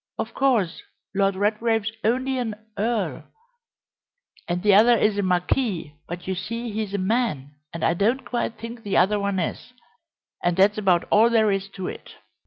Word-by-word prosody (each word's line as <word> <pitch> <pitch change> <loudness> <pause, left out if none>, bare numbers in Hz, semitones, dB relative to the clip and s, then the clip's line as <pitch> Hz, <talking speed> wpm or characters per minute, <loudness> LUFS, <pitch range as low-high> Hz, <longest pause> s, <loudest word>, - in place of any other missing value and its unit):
Of 225 - -4
course, 240 -10 +1 0.3
Lord 195 0 +2
Redgrave's 220 +2 0
only 260 +3 +1
an 225 -4 -2 0.2
earl, 225 +1 -1 1.2
and 175 +1 -2
the 205 -1 +5
other 230 +4 +6
is 210 -1 +2
a - - +3
marquis, 180 - 0
but, 175 +1 -7
you 190 - 0
see, 230 +5 -4
he's 210 -1 -3
a - - +1
man, 190 - -1 0.2
and 165 - -6
I 165 - +3
don't 225 +9 0
quite 235 -2 -2
think 230 +1 -8
the 200 -3 -1
other 200 +4 +3
one 200 -1 -1
is 185 +7 -4 0.7
and 175 0 +1
that's 205 +3 +4
about 185 -4 +2
all 225 +3 +6
there 220 -3 +3
is 195 0 -2
to 190 -2 -4
it." - - -9
210 Hz, 175 wpm, -24 LUFS, 190-230 Hz, 1.2 s, other